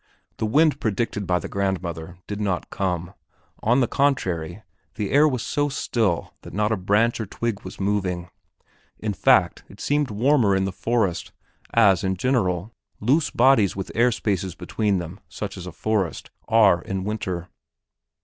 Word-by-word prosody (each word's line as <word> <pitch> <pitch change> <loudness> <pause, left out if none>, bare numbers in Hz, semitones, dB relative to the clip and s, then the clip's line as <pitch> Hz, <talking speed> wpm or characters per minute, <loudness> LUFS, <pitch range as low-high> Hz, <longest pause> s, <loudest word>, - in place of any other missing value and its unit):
The 110 - -1
wind 145 +5 +3
predicted 105 -4 -2
by 90 -1 +2
grandmother 90 -3 -3
did 105 0 -5
not 95 -4 -2
come; 90 -2 -2 0.5
on 120 +4 +3
the 125 - +2
contrary, 95 - 0 0.3
the 105 -3 -3
air 145 +3 +6
was 130 -5 -1
so 145 +2 0
still 110 -9 -1
that - - -10
not 105 +1 +1
a - - +3
branch 105 +5 +1
or 110 - -4
twig 115 +1 -3
was - - -10
moving. 95 -3 -1 0.7
In 105 -1 -2
fact, - - +3
it - - -15
seemed 145 -1 0
warmer 115 -1 +3
in 95 0 +1
the 95 - -2
forest, 105 -3 -1 0.4
as, 100 -6 +5
in 95 -1 0
general, 100 -5 0 0.3
loose 140 +8 +2
bodies 120 -6 +4
with 95 -1 -5
air 120 +2 +3
spaces 95 -5 -2
between, 95 -1 -2
such 100 +1 -5
as 90 -2 -8
a - - -6
forest, 105 -4 -2 0.2
are 105 -6 +5
in 95 0 -4
winter. 95 -4 -3
100 Hz, 160 wpm, -24 LUFS, 95-115 Hz, 0.7 s, air